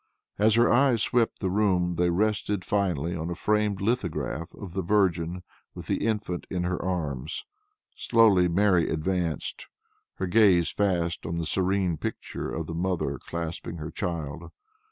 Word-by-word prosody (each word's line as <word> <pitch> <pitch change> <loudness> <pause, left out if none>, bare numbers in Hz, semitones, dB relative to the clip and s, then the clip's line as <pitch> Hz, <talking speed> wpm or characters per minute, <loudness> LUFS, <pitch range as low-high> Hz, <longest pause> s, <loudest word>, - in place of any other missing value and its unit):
As 110 +1 +4
her 120 +1 +5
eyes 120 -3 +4
swept 120 -2 +1
the 95 -3 0
room 95 -4 +2
they 85 +1 +1
rested 100 +1 0
finally 90 -5 0
on 80 0 -4
a 85 - -3
framed 105 0 0
lithograph 95 -7 -2
of 95 -5 -9
the 95 - -1
Virgin, 90 -2 +1 0.3
with - - -8
the - - -1
Infant 105 -5 -2
in 90 -1 -2
her 90 0 -2
arms. 75 -6 -3 0.5
Slowly 105 -6 +4
Mary 90 -1 +3
advanced, 85 0 -2 0.5
her 95 - -2
gaze 95 -3 +4
fast 90 -5 0
on 85 +1 -3
the 85 - -2
serene 95 -1 0
pictured - - -5
face - - -2
of - - -5
the 80 - -6
mother 85 -6 -1
clasping 85 0 -5
her 75 0 -6
child. 80 -4 -4
90 Hz, 155 wpm, -27 LUFS, 85-105 Hz, 0.5 s, her